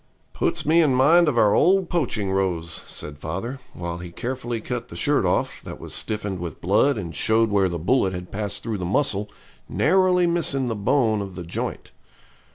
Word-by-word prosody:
'Puts - - 0
me 165 +3 +5
in 145 -5 +3
mind 160 +6 +5
of 140 -5 +1
our 105 -3 +5
old 190 0 +4
poaching 115 - -1
rows,' 85 -4 -1
said 75 0 -7
father, 95 - -5 0.2
while 85 -1 -5
he 90 0 -7
carefully 120 +4 -4
cut 120 +1 -5
the - - -11
shirt - - +2
off, - - -1
that - - -9
was - - -9
stiffened 105 -3 -3
with 85 -1 -6
blood 105 +9 +2
and 85 -5 -5
showed 110 +7 +2
where 100 -2 +3
the 85 - -3
bullet 95 +4 +2
had 90 -1 -7
passed 105 -1 -4
through 110 -3 -3
the - - -4
muscle, 105 0 0 0.4
narrowly 180 +2 +3
missing 150 -7 0
the 115 - -2
bone 110 0 +1
of 95 -2 -7
the 90 - -6
joint. 85 - -5
110 Hz, 190 wpm, -23 LUFS, 90-135 Hz, 0.4 s, me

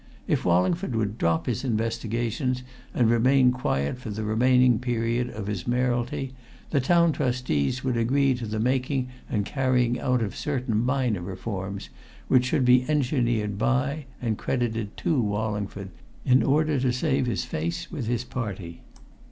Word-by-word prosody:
If - - +1
Wallingford 115 - +2
would 110 -1 -1
drop 85 -1 +1
his 125 +1 -2
investigations 115 +2 -1 0.3
and 120 - +2
remain 125 +3 +4
quiet 120 - -1
for 125 - -7
the 110 +1 -4
remaining 125 +2 +4
period 120 0 -1
of 110 -2 -6
his 100 -4 -4
mayoralty, 125 +1 0 0.4
the 140 - +2
Town 170 +4 +4
Trustees 125 - -1
would 130 -2 0
agree 135 +4 +2
to 120 -2 -5
the 110 +1 -3
making 130 +2 0 0.2
and 105 -3 0
carrying 125 -1 +1
out 125 -3 +1
of 100 - -4
certain 125 -6 -1
minor 125 -6 0
reforms 95 +1 -5 0.4
which 125 -1 +4
should 125 +1 +1
be 125 0 +6
engineered 120 -8 0
by 130 +5 0
and 115 -3 -2
credited 115 -4 -2
to 150 -6 +1
Wallingford 105 -2 -2 0.4
in 130 +1 +5
order 150 0 +2
to 125 -1 +1
save 130 0 0
his 120 - -1
face 170 +1 -3
with 140 -10 -4
his 120 0 0
party. 95 -9 -5
125 Hz, 150 wpm, -26 LUFS, 110-130 Hz, 0.4 s, be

